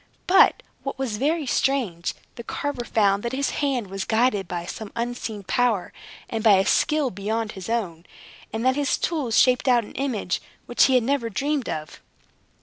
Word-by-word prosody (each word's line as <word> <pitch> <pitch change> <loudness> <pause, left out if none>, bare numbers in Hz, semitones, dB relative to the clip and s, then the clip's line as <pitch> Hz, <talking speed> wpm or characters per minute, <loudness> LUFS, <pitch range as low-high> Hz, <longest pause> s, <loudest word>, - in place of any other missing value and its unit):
But 390 +6 +5 0.2
(what 275 - -5
was 255 -6 -2
very 305 +5 0
strange) 245 -11 0 0.2
the 235 - -8
carver 270 0 -3
found 200 -3 +2
that 235 +2 -4
his 280 +1 0
hand 270 -6 0
was 195 0 -4
guided 220 -4 +1
by 175 -1 -4
some 205 +3 -7
unseen 235 -3 -4
power, 225 -1 0 0.3
and 225 -1 -3
by 220 -3 +7
a 190 0 +4
skill 300 -4 +2
beyond 215 +3 -2
his 190 +1 -8
own, 185 -8 -2 0.4
and 225 +3 -3
that 260 0 +4
his 285 -1 +1
tools 285 -10 -1
shaped 255 +1 +4
out 245 -2 +4
an - - -12
image 235 -10 -2 0.2
which 240 - +4
he 265 - +3
had 250 - +4
never 255 -2 0
dreamed 280 +5 -1
of. 155 -2 -6
235 Hz, 180 wpm, -24 LUFS, 200-270 Hz, 0.4 s, by